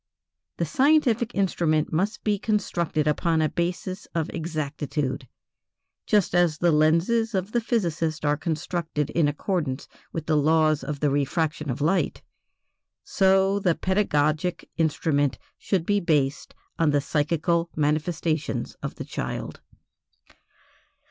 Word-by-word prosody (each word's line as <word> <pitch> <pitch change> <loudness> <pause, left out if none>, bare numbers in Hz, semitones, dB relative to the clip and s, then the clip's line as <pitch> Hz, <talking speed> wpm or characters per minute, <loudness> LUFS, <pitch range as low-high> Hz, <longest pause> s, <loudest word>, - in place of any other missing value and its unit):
The - - 0
scientific 260 -5 +2
instrument 165 -6 +1
must 195 +7 -1
be 205 -2 +1
constructed 175 -8 0
upon 160 +2 +1
a 155 -1 +2
basis 180 +3 -3
of 165 -2 -1
exactitude. 150 -4 -3 0.8
Just 205 -5 +2
as 175 -3 +3
the 175 +1 +3
lenses 170 +9 +2
of 190 +2 -2
the 240 - +1
physicist 165 -9 -1
are 145 0 +3
constructed 160 -1 -2
in 165 -3 +2
accordance 145 -2 -2 0.2
with 165 -2 -4
the 155 - +1
laws 155 -1 +3
of 140 +1 -5
the 145 -2 +2
refraction 150 +2 -1
of 130 +3 -3
light, 165 +6 0 0.8
so 195 +1 +3
the 180 -4 +2
pedagogic 175 -3 0
instrument 150 -3 +1 0.2
should 185 -5 -1
be 205 +1 +2
based 145 -6 0 0.2
on 165 -2 +3
the 145 0 +3
psychical 165 +3 0
manifestations 155 +1 -1
of - - -5
the - - -6
child. - - -5
165 Hz, 125 wpm, -25 LUFS, 150-190 Hz, 0.8 s, as